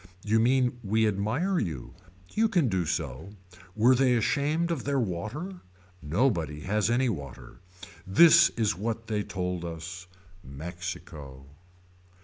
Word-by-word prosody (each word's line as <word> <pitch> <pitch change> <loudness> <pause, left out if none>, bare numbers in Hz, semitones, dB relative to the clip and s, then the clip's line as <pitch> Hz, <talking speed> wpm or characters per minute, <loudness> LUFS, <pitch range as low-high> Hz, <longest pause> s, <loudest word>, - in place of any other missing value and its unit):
You 110 +2 +2
mean 125 +1 +2
we 110 +2 +2
admire 115 - 0
you. 75 -8 -4 0.4
You 225 +1 +3
can 175 - +2
do 90 -4 -1
so. 80 +2 -4 0.4
Were 115 +4 +5
they 130 -1 +3
ashamed 150 +8 0
of 165 - -2
their 140 -1 0
water. 125 - -4 0.4
Nobody 80 - 0
has 105 +4 0
any 125 +2 +2
water. 70 - -6 0.5
This 170 - +7
is 110 -3 +1
what 115 +4 -3
they 105 -2 -1
told 90 -3 -4
us. 85 +2 -7 0.4
Mexico. 75 -3 -8
105 Hz, 130 wpm, -28 LUFS, 85-130 Hz, 0.5 s, This